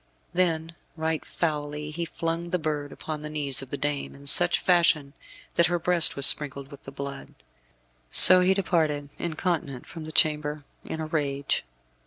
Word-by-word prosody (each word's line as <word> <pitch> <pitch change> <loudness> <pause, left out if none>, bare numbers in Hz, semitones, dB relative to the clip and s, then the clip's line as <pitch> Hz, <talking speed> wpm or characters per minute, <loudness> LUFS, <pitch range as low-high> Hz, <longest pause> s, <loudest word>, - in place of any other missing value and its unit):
Then, 165 -2 -1 0.2
right 160 0 -3
foully, 150 -2 -5
he 170 +2 -5
flung 165 +1 -5
the 180 - -1
bird 150 -3 -5
upon 155 -1 -8
the 150 - -8
knees 145 -4 -1
of 135 - -11
the 140 - -5
dame, 145 -1 -4
in 140 0 -16
such 175 +5 +6
fashion 165 -6 +1 0.4
that 170 - +3
her 175 +1 -1
breast 175 -1 +3
was 140 - +6
sprinkled 140 -1 +2
with 140 - -13
the 135 - -11
blood. 140 0 -9 0.7
So 185 - +10
he 185 +1 +1
departed, 155 -7 -2
incontinent, 160 -6 -4
from 165 -2 -11
the 155 - -9
chamber 150 -1 -1 0.2
in 160 - -7
a - - -4
rage. 140 -3 -3
155 Hz, 170 wpm, -24 LUFS, 145-170 Hz, 0.7 s, So